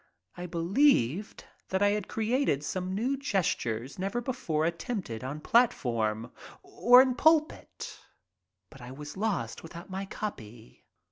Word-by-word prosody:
I 180 Hz, 0 st, -6 dB
believed 175 Hz, -, +2 dB, 0.3 s
that 190 Hz, +1 st, +1 dB
I 205 Hz, -, +5 dB
had 205 Hz, -1 st, -1 dB
created 225 Hz, -, 0 dB
some 185 Hz, +3 st, -3 dB
new 250 Hz, +7 st, 0 dB
gestures 145 Hz, -, -2 dB
never 195 Hz, +5 st, -1 dB
before 235 Hz, -, -1 dB
attempted 170 Hz, -, -3 dB
on 140 Hz, +4 st, -5 dB
platform, 115 Hz, -, +1 dB, 0.3 s
or 245 Hz, +2 st, +6 dB
in 260 Hz, -1 st, 0 dB
pulpit, 315 Hz, +4 st, +1 dB, 0.7 s
but 140 Hz, -, -14 dB
I 125 Hz, -, -9 dB
was 145 Hz, +3 st, -8 dB
lost 190 Hz, -, -2 dB
without 170 Hz, +3 st, -10 dB
my 190 Hz, +1 st, -3 dB
copy. 120 Hz, -, -8 dB
185 Hz, 130 wpm, -29 LUFS, 135-230 Hz, 0.7 s, or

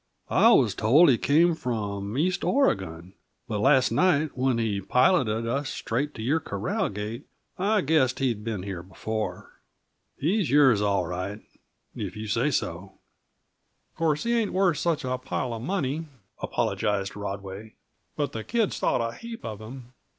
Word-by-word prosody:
"I -, -, +6 dB
was -, -, +4 dB
told 145 Hz, +11 st, +5 dB
he 120 Hz, -, +2 dB
came 165 Hz, +4 st, +4 dB
from 105 Hz, -6 st, -3 dB
east 185 Hz, +6 st, 0 dB
Oregon. 95 Hz, -, 0 dB, 0.3 s
But 110 Hz, -4 st, -2 dB
last 135 Hz, +2 st, +4 dB
night, 155 Hz, -5 st, +2 dB
when 130 Hz, -1 st, +1 dB
he 110 Hz, -4 st, -1 dB
piloted 115 Hz, -, +2 dB
us 135 Hz, +4 st, -1 dB
straight 145 Hz, +6 st, -3 dB
to 110 Hz, -, -6 dB
your 145 Hz, +8 st, +2 dB
corral 100 Hz, -7 st, -2 dB
gate, 105 Hz, +5 st, -6 dB, 0.3 s
I 205 Hz, +2 st, +2 dB
guessed 140 Hz, -5 st, +2 dB
he'd 120 Hz, -6 st, -1 dB
been 105 Hz, -5 st, -3 dB
here 95 Hz, -3 st, -5 dB
before. 105 Hz, +4 st, -5 dB, 0.6 s
He's 180 Hz, -, +1 dB
yours, 135 Hz, -6 st, +5 dB
all 100 Hz, -3 st, +1 dB
right, 90 Hz, +4 st, -4 dB, 0.6 s
if -, -, -5 dB
you 105 Hz, +1 st, -6 dB
say 115 Hz, +7 st, +1 dB
so." 95 Hz, -, -3 dB, 1.0 s
"Uh -, -, -35 dB
course 155 Hz, -3 st, +1 dB
he 235 Hz, 0 st, +1 dB
ain't 225 Hz, -4 st, 0 dB
worth 185 Hz, -5 st, +2 dB
such 165 Hz, -5 st, 0 dB
a 130 Hz, 0 st, -2 dB
pile 125 Hz, -1 st, -3 dB
uh 115 Hz, -, -5 dB
money," 155 Hz, -, -2 dB, 0.3 s
apologized 100 Hz, -2 st, -1 dB
Rodway, 100 Hz, +1 st, -6 dB, 0.4 s
"but 145 Hz, -2 st, -1 dB
the 110 Hz, -, -5 dB
kids 225 Hz, -, 0 dB
thought 115 Hz, -, +1 dB
a 115 Hz, -, -7 dB
heap 230 Hz, -, -9 dB
of 110 Hz, -2 st, -6 dB
him. 125 Hz, +2 st, -10 dB
125 Hz, 160 wpm, -26 LUFS, 105-150 Hz, 1.0 s, I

